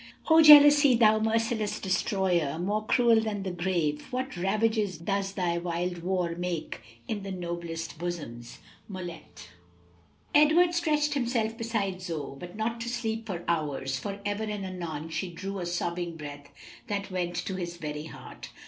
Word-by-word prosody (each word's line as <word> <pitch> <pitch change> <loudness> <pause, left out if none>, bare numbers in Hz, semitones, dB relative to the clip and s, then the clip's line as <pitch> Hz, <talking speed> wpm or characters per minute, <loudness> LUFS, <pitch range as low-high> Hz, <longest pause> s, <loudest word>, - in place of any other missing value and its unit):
"O 320 0 +8
jealousy! 290 -3 +9
thou 220 -2 +5
merciless 220 -1 0
destroyer, 185 -6 0
More 205 +5 -1
cruel 230 0 +4
than 210 -3 -3
the 190 - -3
grave! 170 -4 -1
what 255 -1 -3
ravages 210 +1 0
Does 195 +3 -2
thy 175 -3 0
wild 175 +1 -2
war 180 -1 -1
make 175 -6 -4 0.3
in 210 -2 -3
the 195 - -6
noblest 170 -3 -5
bosoms!" 150 -10 -6 0.3
Mullet. 180 -4 -9 0.8
Edward 320 +4 +5
stretched 300 -4 +1
himself 235 -4 0
beside 220 -5 -2
Zoe, 160 -6 -5
but 175 +4 -9
not 230 +2 -2
to 235 - -3
sleep 225 -2 -3
for 175 -4 -4
hours, 145 -5 -1
for 200 +6 -5
ever 205 +1 -1
and 210 -2 -4
anon 165 -4 -5
she 160 +3 -3
drew 195 +3 -5
a 175 - -3
sobbing 175 -1 -2
breath 145 -2 -9 0.4
that 205 -2 -3
went 175 -1 -2
to 175 +3 -3
his 175 -1 -5
very 150 -2 -5
heart. 160 - -10
190 Hz, 155 wpm, -28 LUFS, 170-220 Hz, 0.8 s, jealousy